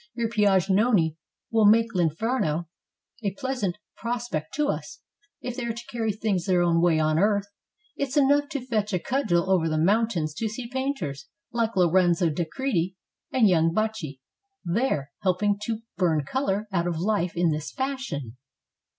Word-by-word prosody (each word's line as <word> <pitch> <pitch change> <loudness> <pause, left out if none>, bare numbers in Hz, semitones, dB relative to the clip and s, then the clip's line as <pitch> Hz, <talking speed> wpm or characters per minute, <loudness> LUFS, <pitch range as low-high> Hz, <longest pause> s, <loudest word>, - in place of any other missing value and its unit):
"Your 230 -1 -1
Piagnoni 200 -4 +3 0.4
will 220 -2 +5
make 230 +2 +4
T 180 - +1
inferno 170 - 0 0.6
a 200 -2 -1
pleasant 250 -9 -2 0.2
prospect 235 -10 -3
to 300 0 +1
us, - - -4 0.4
if 250 -1 -4
they 250 -2 -3
are 230 - -1
to 235 - -8
carry 225 -2 0
things 200 -4 -1
their 180 -2 +3
own 170 -1 +3
way 170 -2 +4
on 155 0 +2
earth. 200 0 +2 0.5
It 280 - -1
's 280 - -2
enough 285 0 +4
to 275 -4 -4
fetch 215 -4 -1
a 180 - +2
cudgel 180 -5 0
over 180 -4 +2
the 155 - 0
mountains 185 -3 +1
to 225 - 0
see 235 +3 -6
painters, 235 - -3 0.2
like 230 -1 0
Lorenzo 175 -2 +3
di 170 +3 -1
Credi 190 -5 -1 0.4
and 245 -5 +4
young 165 -2 +3
Baccio 215 -10 -2 0.5
there, 170 - 0
helping 200 +2 +1
to 225 -1 -3 0.2
burn 160 -6 +2
color 210 - -1
out 175 -2 0
of 170 -2 -1
life 185 -1 0
in 170 -1 +3
this 150 0 -3
fashion." 260 - -4
200 Hz, 165 wpm, -26 LUFS, 170-235 Hz, 0.6 s, will